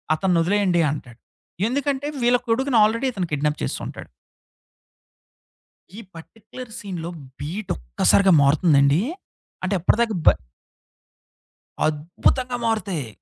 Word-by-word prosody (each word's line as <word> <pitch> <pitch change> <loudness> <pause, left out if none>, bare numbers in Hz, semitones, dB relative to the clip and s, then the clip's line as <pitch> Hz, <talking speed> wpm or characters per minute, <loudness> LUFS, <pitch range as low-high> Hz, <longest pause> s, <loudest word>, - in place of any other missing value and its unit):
"అతనొదిలేయండి" 180 +1 +2
అంటాడు. 125 -5 -8 0.5
ఎందుకంటే, 280 +1 -1 0.2
వీళ్ళ 245 +1 +4
కొడుకును 255 +2 +1
ఆల్రెడీ 230 +5 +1
ఇతను 185 -4 -3
కిడ్నాప్ 150 +1 -1
చేసుంటాడు. - - -6 1.9
ఈ - - -7 0.2
పర్టిక్యులర్ 225 +8 -11
సీన్‌లో 175 -5 -6 0.3
బీట్ 180 +7 -5
ఒక్కసారిగా - - +3
మారుతుందండి, 140 +1 +4 0.6
అంటే 185 +2 -1
అప్పటి 175 - +2
దాకా 225 -3 +1
బ - - +1 1.6
అద్భుతంగా 175 - -1
మారుతాయి. 200 - -1
190 Hz, 95 wpm, -22 LUFS, 155-230 Hz, 1.9 s, వీళ్ళ